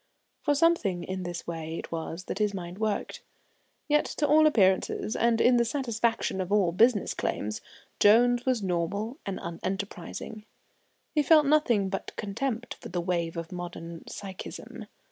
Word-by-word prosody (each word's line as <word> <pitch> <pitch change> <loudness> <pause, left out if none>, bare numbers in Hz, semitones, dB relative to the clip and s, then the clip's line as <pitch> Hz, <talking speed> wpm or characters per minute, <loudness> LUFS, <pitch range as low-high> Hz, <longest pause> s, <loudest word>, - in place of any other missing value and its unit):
For 290 - +2
something 275 - +2
in 190 0 -4
this 175 -1 -5
way 165 -1 -5
it - - -7
was 165 +1 -4
that 195 - -5
his 210 -1 +1
mind 180 +1 -7
worked. 215 -2 -2 0.7
Yet, 300 -1 +3
to 295 - +2
all 310 +1 +6
appearances, 200 -4 +2
and 235 -1 +2
in 245 0 +5
the 235 - +4
satisfaction 230 -5 -1
of 185 +1 -5
all 200 -5 +3
business 215 +3 +3
claims, 105 +1 -3 0.4
Jones 240 +3 +5
was 250 -5 0
normal 200 - -2
and 195 - -3
unenterprising. 195 +4 -5 0.7
He 300 - +3
felt 305 +1 +6
nothing 265 -9 +3
but 195 - -5
contempt 230 +3 -3
for - - -8
the 175 - -2
wave 170 -2 -1
of 165 -1 -5
modern 170 -2 -7
psychism. 195 -2 -8
205 Hz, 155 wpm, -28 LUFS, 175-240 Hz, 0.7 s, all